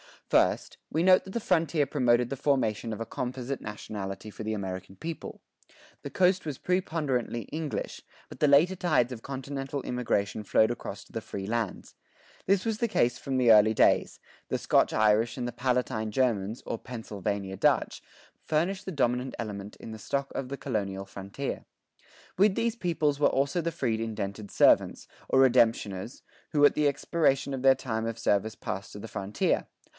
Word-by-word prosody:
First, - - +2
we 160 +3 0
note 185 0 +5
that 190 - -8
the 235 - 0
frontier 165 -5 +2
promoted 125 -4 +2
the 135 - -4
formation 120 -5 0
of 110 - -6
a - - -2
composite 130 +3 -4
nationality 105 -1 -6
for 110 - -8
the 110 0 -2
American 95 -2 -5
people. 165 - -7 0.6
The - - -5
coast 185 0 +2
was 145 -4 -4
preponderantly 150 -10 -1
English, 155 -2 -4 0.3
but - - -11
the 150 - +4
later 150 +7 +5
tides 155 -9 +2
of 120 -3 -7
continental 135 +1 -5
immigration 110 -4 -1
flowed 110 +2 +3
across 115 -4 -6
to - - -22
the 115 - -4
free 100 -2 -6
lands. 115 -1 -3 0.5
This 195 +1 +3
was 225 -2 0
the 235 - +1
case 125 - +1
from 135 -1 -2
the 125 -3 +5
early 110 0 +6
colonial - - +5
days. - - -13 0.3
The - - -1
Scotch - - +3
Irish 110 +2 +3
and 120 -1 -2
the - - -3
Palatine 125 -4 -1
Germans, 110 -3 0
or 115 - -3
"Pennsylvania 100 -4 -4
Dutch," - - +1 0.4
furnished 185 +6 0
the 190 - -4
dominant 125 -2 0
element 105 -3 -6
in - - -10
the 110 - -8
stock 140 +5 -2
of 135 - -3
the 140 +2 -5
colonial 100 -7 -3
frontier. 100 +9 -6 0.7
With 195 +1 +4
these 230 0 0
peoples 155 -7 0
were 150 - +5
also 140 +5 +1
the 170 +1 -2
freed 120 -8 -1
indented 105 -2 -4
servants, - - +3 0.2
or 130 - +5
redemptioners, 115 -4 +2 0.3
who 145 -1 +3
at - - +6
the 150 -1 +2
expiration 140 -1 +1
of 130 -1 -4
their 135 0 +7
time 115 -3 -3
of 115 0 -4
service 110 -1 +1
passed 95 - -5
to 105 - -8
the 115 - -8
frontier. 100 +1 -1
125 Hz, 180 wpm, -28 LUFS, 110-145 Hz, 0.7 s, their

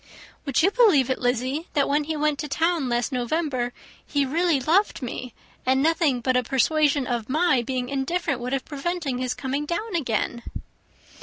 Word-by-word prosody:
"Would 275 +2 +2
you 385 - +4
believe 380 - +4
it, 260 - -1
Lizzy, 255 +6 -1
that 285 - +3
when 295 +1 +1
he 315 0 -2
went 300 -1 0
to 300 - -3
town 325 -2 0
last 240 +2 0
November 255 -1 -1 0.3
he 285 -1 0
really 325 +2 +1
loved 325 +4 +1
me, 250 0 -5 0.3
and 260 +1 +2
nothing 315 -6 +2
but 255 +1 +1
a 250 - +4
persuasion 280 +3 +2
of 240 -2 -3
my 305 -3 +3
being 250 +1 -3
indifferent 280 +1 -1
would 245 +1 -4
have 270 -1 -1
prevented 290 -3 -3
his 250 -1 -2
coming 270 +3 -2
down 395 +4 -3
again?" 235 -5 -1
275 Hz, 175 wpm, -24 LUFS, 250-320 Hz, 0.3 s, you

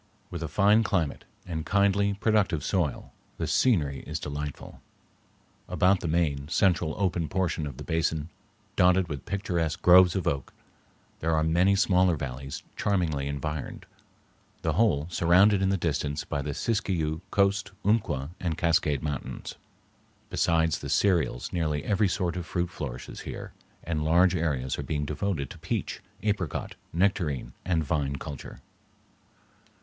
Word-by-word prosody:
With 85 - -5
a 80 - -2
fine 105 +6 +4
climate, 90 -9 -1 0.2
and 80 -3 -4
kindly, 100 +2 +2
productive 100 -7 +1
soil, 85 -7 -1 0.2
the - - -2
scenery 75 - +2
is 75 +2 -3
delightful. 75 -1 -6 0.9
About 95 +1 +3
the - - -4
main, 75 -4 0
central 85 -3 +2
open 90 -5 0
portion 90 -3 -1
of 70 - -8
the - - -7
basin, 80 -1 -1 0.5
dotted 90 0 +4
with 70 -4 -6
picturesque 85 -5 -1
groves 90 0 +7
of 95 - -1
oak, 70 -1 -2 0.7
there 80 0 +1
are 80 - +2
many 90 +5 +3
smaller 90 -2 +3
valleys 70 -1 -6
charmingly 80 -8 0
environed, 70 +1 -4 0.8
the - - +1
whole 90 -11 +2
surrounded 95 +4 +4
in 95 - +2
the 95 - +2
distance 75 -4 -1
by 70 - -3
the 70 0 -4
Siskiyou, 85 -8 -1
Coast, 100 +1 +2 0.2
Umpqua, 80 -10 +1
and 85 -3 -2
Cascade 80 -4 +1
Mountains. 75 -4 -4 0.8
Besides 80 -1 +2
the - - -6
cereals 85 -11 +1
nearly 80 -4 -1
every 105 0 +2
sort 90 -1 -1
of 90 -2 -5
fruit 90 0 -2
flourishes - - -6
here, - - -7 0.3
and 80 -3 -2
large 85 +4 +4
areas 70 -7 -1
are - - -1
being 75 -1 -2
devoted 75 -2 -2
to - - -11
peach, - - -3 0.2
apricot, 100 -7 -2 0.2
nectarine, 85 -9 0
and 85 -3 +1
vine 70 -2 -1
culture. 70 0 -8
85 Hz, 145 wpm, -27 LUFS, 75-95 Hz, 0.9 s, groves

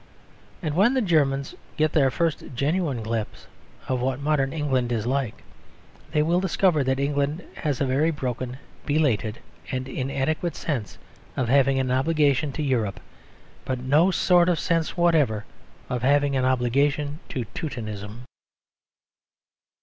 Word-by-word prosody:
And 150 -2 -2
when 220 +9 +4
the 260 - +2
Germans 140 -6 +1 0.2
get 155 0 +2
their 140 -4 +4
first 165 +3 -1
genuine 140 -2 0
glimpse 110 -1 -4 0.4
of 130 -1 -1
what 130 +1 -1
modern 140 -2 +1
England 135 -5 0
is 115 -2 -1
like 130 -2 -2 0.7
they 150 - +2
will 170 +3 +2
discover 180 -4 +2
that 130 0 0
England 145 +3 0
has 145 -4 -1
a 140 - +1
very 135 +5 +2
broken, 130 -4 -3 0.3
belated 125 -8 +1 0.3
and 130 0 -3
inadequate 135 +6 -2
sense 125 - -3 0.4
of 125 -3 0
having 135 0 +4
an 130 -1 0
obligation 145 +1 +2
to 155 - -3
Europe, 115 -8 0 0.6
but 130 - -2
no 145 +8 +3
sort 180 -1 +4
of 170 -3 +1
sense 165 0 0
whatever 150 -11 +2 0.4
of 125 -2 -2
having 140 +1 +3
any 130 -1 +2
obligation 140 +4 +1
to 125 -4 -3
Teutonism. 110 - -6
140 Hz, 140 wpm, -25 LUFS, 130-155 Hz, 0.7 s, when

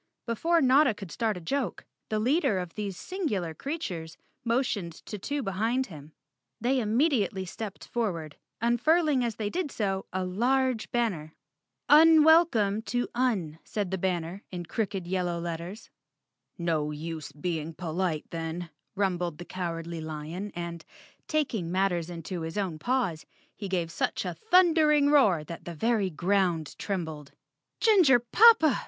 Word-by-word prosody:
Before 330 +9 +2
Notta 265 -2 +5
could 195 -4 -9
start 220 -4 -1
a - - -5
joke, 255 +10 -3 0.2
the 215 - 0
leader 265 - +2
of 180 -2 -4
these 200 -3 -4
singular 215 - -3
creatures 180 - -5 0.3
motioned 230 -7 0
to 210 - -6
two 285 +7 -3
behind 225 +6 0
him. 150 0 -12 0.5
They 255 +4 +1
immediately 220 - +1
stepped 205 +2 -7
forward, 170 -10 -2 0.3
unfurling 270 +4 +3
as 230 -3 -2
they 210 -1 -3
did 360 -4 -2
so 195 -6 -2
a 185 0 -2
large 245 +5 +1
banner. 185 -11 -1 0.5
"Unwelcome 310 -9 +6
to 245 0 -1
Un," 205 -11 0
said 205 -4 -3
the 190 - 0
banner 180 0 -2
in 175 -2 -6
crooked 195 -1 -2
yel¬ 185 +1 -1
low 175 -1 -2
letters. 170 +5 -6 0.7
"No 160 -4 0
use 155 0 -6
being 160 +1 -4
polite 170 -2 -2
then," 165 +1 -4 0.2
rumbled 180 -5 -1
the 175 - -8
Cowardly 170 -2 -4
Lion 160 +6 -5
and, 170 -2 -5 0.4
taking 230 - -1
matters 180 -3 0
into 175 +1 -5
his 160 +4 -5
own 185 -6 -2
paws, 230 -7 -1 0.3
he 200 -2 -6
gave 175 -3 -1
such - - -1
a - - -2
thundering 320 -8 +4
roar 205 - +4
that 165 +2 -9
the 170 - -6
very 220 +1 +1
ground 175 -2 0
trembled. 160 -7 -4 0.5
"Ginger 375 - +6
poppa!" 320 - +6
195 Hz, 145 wpm, -28 LUFS, 170-250 Hz, 0.7 s, Unwelcome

